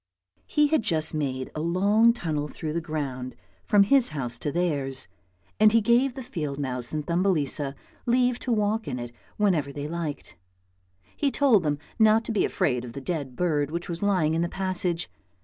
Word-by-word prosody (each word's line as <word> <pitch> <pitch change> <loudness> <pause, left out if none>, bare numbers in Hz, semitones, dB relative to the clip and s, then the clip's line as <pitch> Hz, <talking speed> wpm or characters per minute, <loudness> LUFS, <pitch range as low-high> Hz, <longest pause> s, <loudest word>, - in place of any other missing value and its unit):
He 300 - +3
had 315 -3 +3
just 160 -5 +1
made 130 -4 -2
a - - -5
long 200 +7 +4
tunnel 155 -10 -2
through 155 +1 -5
the 170 - -1
ground 140 -6 -4 0.3
from 205 -1 +5
THUMBELISA - - -3
73 275 - +5
his 265 -3 +5
house 125 -6 -4
to 145 - -2
theirs, 145 -6 0 0.5
and 215 0 +7
he 230 - +5
gave 240 +4 +2
the 265 - -6
field 150 - -4
mouse 125 -4 -3
and 150 -1 -3
Thumbelisa 155 -6 0 0.3
leave 245 0 +2
to 250 - -3
walk 215 0 0
in 130 -3 -3
it 120 -1 -6 0.3
whenever 175 -9 +1
they 145 +1 -5
liked. 165 -2 -5 0.8
He 285 - +1
told 265 -7 +4
them 150 -3 0 0.2
not 220 +1 +5
to - - -3
be 215 - +2
afraid 125 -4 0
of 120 -2 -8
the 140 - -5
dead 140 -4 -4
bird 150 -4 0
which 170 +3 -4
was 170 -1 -4
lying 185 -6 +2
in 165 - +1
the 170 - 0
passage. 180 -3 -1
170 Hz, 195 wpm, -26 LUFS, 145-210 Hz, 0.8 s, and